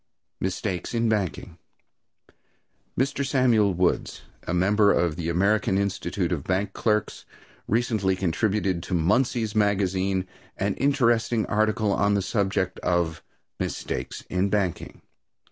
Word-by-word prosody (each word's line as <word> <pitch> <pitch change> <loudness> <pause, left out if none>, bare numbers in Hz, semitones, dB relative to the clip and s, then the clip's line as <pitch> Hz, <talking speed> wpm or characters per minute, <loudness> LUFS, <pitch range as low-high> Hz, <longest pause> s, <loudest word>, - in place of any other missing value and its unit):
Mistakes 95 +2 -3
in 115 0 +1
Banking. 105 -6 -2 1.4
Mr. 135 +1 0
Samuel 120 -8 +3
Woods, 90 0 0 0.2
a - - -1
member 100 +4 +3
of 85 -3 +1
the 85 0 -3
American 95 +3 +2
Institute 100 -2 -1
of 80 -6 -2
Bank 95 +3 -1
Clerks, 105 -2 -1 0.4
recently 110 -4 +1
contributed 95 0 0
to 90 - -3
Munsey's 110 +5 +1
Magazine 95 -3 +1 0.3
an - - 0
interesting 120 -5 +2
article 110 0 +1
on 100 +1 +2
the 100 - 0
subject 95 -3 -1
of 85 -2 0 0.4
"Mistakes - - -4
in 90 +2 0
Banking." 95 -4 -2
100 Hz, 115 wpm, -25 LUFS, 90-110 Hz, 1.4 s, Samuel